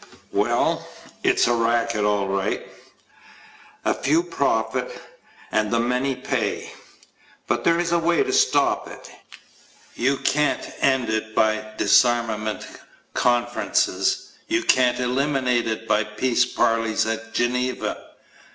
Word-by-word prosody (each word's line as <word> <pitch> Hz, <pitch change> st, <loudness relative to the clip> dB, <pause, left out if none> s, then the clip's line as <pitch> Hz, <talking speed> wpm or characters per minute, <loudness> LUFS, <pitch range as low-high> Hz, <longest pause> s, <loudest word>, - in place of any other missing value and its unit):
WELL, -, -, 0 dB, 0.3 s
it's -, -, +3 dB
a 120 Hz, -, +2 dB
racket, 115 Hz, -2 st, +1 dB
all 100 Hz, -1 st, +1 dB
right. 95 Hz, 0 st, -2 dB, 1.2 s
A -, -, +3 dB
few 155 Hz, +5 st, +1 dB
profit 115 Hz, -10 st, -1 dB, 0.5 s
and 110 Hz, -1 st, +1 dB
the 115 Hz, -, +1 dB
many 125 Hz, +3 st, 0 dB
pay. 125 Hz, -4 st, -3 dB, 0.7 s
But -, -, -1 dB
there 170 Hz, 0 st, +3 dB
is 175 Hz, -1 st, -1 dB
a 170 Hz, -, +3 dB
way 170 Hz, +1 st, +2 dB
to 400 Hz, -1 st, -3 dB
stop 420 Hz, +2 st, +2 dB
it. -, -, -11 dB, 0.8 s
You 140 Hz, +1 st, +1 dB
can't 145 Hz, -2 st, 0 dB
end 130 Hz, -3 st, +2 dB
it 110 Hz, 0 st, -3 dB
by 110 Hz, 0 st, +1 dB
disarmament 115 Hz, -3 st, +2 dB, 0.5 s
conferences. 120 Hz, -, 0 dB, 0.2 s
You 335 Hz, +1 st, 0 dB
can't 125 Hz, -1 st, +3 dB
eliminate 125 Hz, -1 st, 0 dB
it 110 Hz, 0 st, -4 dB
by 105 Hz, +1 st, +2 dB
peace 120 Hz, +4 st, +1 dB
parleys 115 Hz, -1 st, +1 dB
at 115 Hz, 0 st, -4 dB
Geneva. 125 Hz, +1 st, -1 dB
120 Hz, 120 wpm, -23 LUFS, 110-135 Hz, 1.2 s, it's